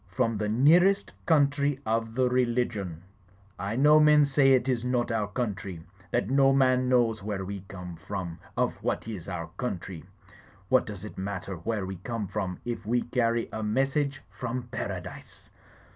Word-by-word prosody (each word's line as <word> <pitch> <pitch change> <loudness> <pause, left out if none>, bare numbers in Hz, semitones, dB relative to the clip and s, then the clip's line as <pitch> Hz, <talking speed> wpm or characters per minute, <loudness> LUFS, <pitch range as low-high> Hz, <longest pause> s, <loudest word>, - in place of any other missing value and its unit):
From 115 -4 0
the 105 -1 -1
near 145 +11 +6
est 200 0 0 0.2
country 145 -3 +3
of 115 0 -1
the 130 0 +3
Religion! 120 -8 0 0.6
I 100 +4 -2
know 150 +4 +6
men 150 -1 +6
say 135 -1 +4
it 130 0 +2
is 125 -3 0
not 125 -1 0
our 110 -2 0
country; 100 -6 -4 0.3
that - - 0
no 135 +2 +4
man 130 -1 +3
knows 120 -4 +2
where 100 -2 -3
we 100 +1 -5
come 90 -3 -8
from, 85 -1 -5 0.2
of - - 0
what - - -2
is 100 -7 -6
our 85 -1 -4
country. 95 -8 -4 0.7
What 130 - +4
does 105 -2 -7
it 105 - -9
matter 95 0 -4
where 100 +4 -3
we 95 0 -5
come 110 +3 -4
from 95 -3 -3
if 120 -2 -4
we 120 +3 +1
carry 115 -1 0
a 110 - -3
message 135 +5 0
from 125 0 -4
Paradise? - - -7
115 Hz, 170 wpm, -28 LUFS, 100-130 Hz, 0.7 s, near